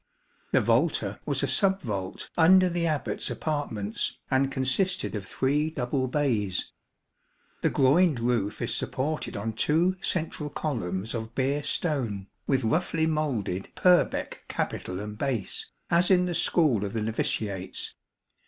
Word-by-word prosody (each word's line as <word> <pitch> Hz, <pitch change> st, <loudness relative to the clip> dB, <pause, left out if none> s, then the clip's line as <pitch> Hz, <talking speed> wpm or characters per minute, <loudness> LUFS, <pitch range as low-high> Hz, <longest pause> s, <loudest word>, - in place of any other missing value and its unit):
The -, -, +4 dB
volta -, -, +1 dB
was -, -, +1 dB
a -, -, +2 dB
sub 195 Hz, -1 st, +2 dB
vault 100 Hz, -6 st, -4 dB
under 185 Hz, +2 st, +6 dB
the 170 Hz, -1 st, 0 dB
Abbat's 155 Hz, -3 st, -1 dB
apartments, 115 Hz, -9 st, -2 dB
and 135 Hz, +1 st, +2 dB
consisted 180 Hz, +9 st, +1 dB
of 100 Hz, -3 st, -5 dB
three 145 Hz, +7 st, +1 dB
double 130 Hz, -2 st, -1 dB
bays. 115 Hz, -9 st, 0 dB, 0.9 s
The -, -, +3 dB
groined 145 Hz, +2 st, +4 dB
roof 115 Hz, -3 st, 0 dB
is -, -, -1 dB
supported 150 Hz, -1 st, -2 dB
on 110 Hz, +2 st, -3 dB
two 165 Hz, -, +2 dB
central 155 Hz, -3 st, -1 dB
columns 110 Hz, -, -3 dB
of 115 Hz, -1 st, -5 dB
Beer 140 Hz, +2 st, +1 dB
stone, 125 Hz, -, -1 dB, 0.2 s
with 135 Hz, -2 st, +2 dB
roughly 160 Hz, +7 st, +1 dB
moulded 135 Hz, -, -1 dB
Purbeck 180 Hz, -1 st, +2 dB
capital 90 Hz, 0 st, -3 dB
and 105 Hz, +1 st, -7 dB
base, 125 Hz, -8 st, -2 dB, 0.2 s
as 175 Hz, +1 st, +4 dB
in 180 Hz, -2 st, +5 dB
the 180 Hz, -, -2 dB
school 155 Hz, -, +2 dB
of 100 Hz, -, -4 dB
the 110 Hz, -2 st, -1 dB
novitiates. 100 Hz, -3 st, -2 dB
135 Hz, 135 wpm, -27 LUFS, 110-160 Hz, 0.9 s, under